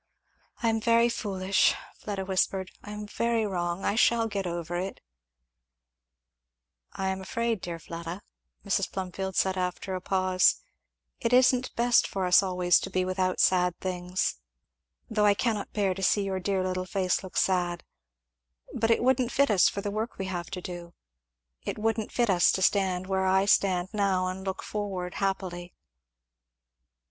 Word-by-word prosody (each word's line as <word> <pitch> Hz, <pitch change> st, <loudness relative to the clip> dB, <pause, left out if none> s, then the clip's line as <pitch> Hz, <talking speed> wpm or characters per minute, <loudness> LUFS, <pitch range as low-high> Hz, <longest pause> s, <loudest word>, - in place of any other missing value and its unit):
"I 230 Hz, -, +3 dB
am 225 Hz, 0 st, 0 dB
very 235 Hz, +1 st, +4 dB
foolish 195 Hz, -4 st, +1 dB
" -, -, -22 dB
Fleda 200 Hz, -2 st, -4 dB
whispered, 190 Hz, 0 st, 0 dB
"I -, -, -10 dB
am 210 Hz, 0 st, -6 dB
very 230 Hz, +1 st, 0 dB
wrong 175 Hz, -2 st, -2 dB
I -, -, +2 dB
shall 230 Hz, +1 st, +3 dB
get 200 Hz, -3 st, -3 dB
over 170 Hz, 0 st, -4 dB
it 185 Hz, +2 st, -4 dB, 0.9 s
" -, -, -43 dB
"I 190 Hz, 0 st, -2 dB
am 190 Hz, 0 st, -3 dB
afraid, 230 Hz, +1 st, -2 dB
dear 170 Hz, -1 st, -5 dB
Fleda," 170 Hz, +3 st, -7 dB, 0.4 s
Mrs. 195 Hz, -1 st, 0 dB
Plumfield 190 Hz, 0 st, -4 dB
said 190 Hz, -1 st, +1 dB
after 180 Hz, +1 st, -3 dB
a 185 Hz, -, -3 dB
pause, 185 Hz, -1 st, +2 dB, 0.6 s
"it 230 Hz, -, -1 dB
isn't 255 Hz, 0 st, +4 dB
best 240 Hz, 0 st, +3 dB
for 190 Hz, -1 st, -2 dB
us 180 Hz, +2 st, +6 dB
always 180 Hz, -2 st, +3 dB
to -, -, -5 dB
be 185 Hz, 0 st, 0 dB
without 185 Hz, 0 st, -1 dB
sad 180 Hz, -1 st, +3 dB
things 180 Hz, -, -2 dB, 0.7 s
though 210 Hz, -2 st, +2 dB
I 205 Hz, -, +5 dB
cannot 220 Hz, -2 st, -1 dB
bear 200 Hz, -3 st, 0 dB
to 195 Hz, -, -7 dB
see 200 Hz, +2 st, +2 dB
your 190 Hz, -1 st, -2 dB
dear 190 Hz, 0 st, 0 dB
little 185 Hz, 0 st, -2 dB
face 185 Hz, 0 st, 0 dB
look 190 Hz, -, -7 dB
sad 175 Hz, -2 st, +1 dB, 0.9 s
but 225 Hz, 0 st, 0 dB
it 230 Hz, -, +3 dB
wouldn't 255 Hz, -1 st, +2 dB
fit 280 Hz, -4 st, +3 dB
us 195 Hz, -4 st, +5 dB
for 200 Hz, -, -5 dB
the 205 Hz, -, -3 dB
work 215 Hz, +3 st, -3 dB
we 190 Hz, -, -3 dB
have 175 Hz, -2 st, -4 dB
to 185 Hz, -2 st, -5 dB
do 175 Hz, -1 st, -8 dB, 0.7 s
it -, -, -4 dB
wouldn't 220 Hz, 0 st, -1 dB
fit 240 Hz, -4 st, +2 dB
us 175 Hz, -2 st, +4 dB
to 190 Hz, -, 0 dB
stand 185 Hz, -2 st, +2 dB
where 190 Hz, 0 st, 0 dB
I 190 Hz, +1 st, +3 dB
stand 185 Hz, -2 st, +2 dB
now 195 Hz, -3 st, +1 dB
and 185 Hz, +1 st, -4 dB
look 190 Hz, 0 st, -4 dB
forward 190 Hz, -4 st, -4 dB
happily." 180 Hz, -3 st, -3 dB
190 Hz, 170 wpm, -28 LUFS, 180-205 Hz, 0.9 s, us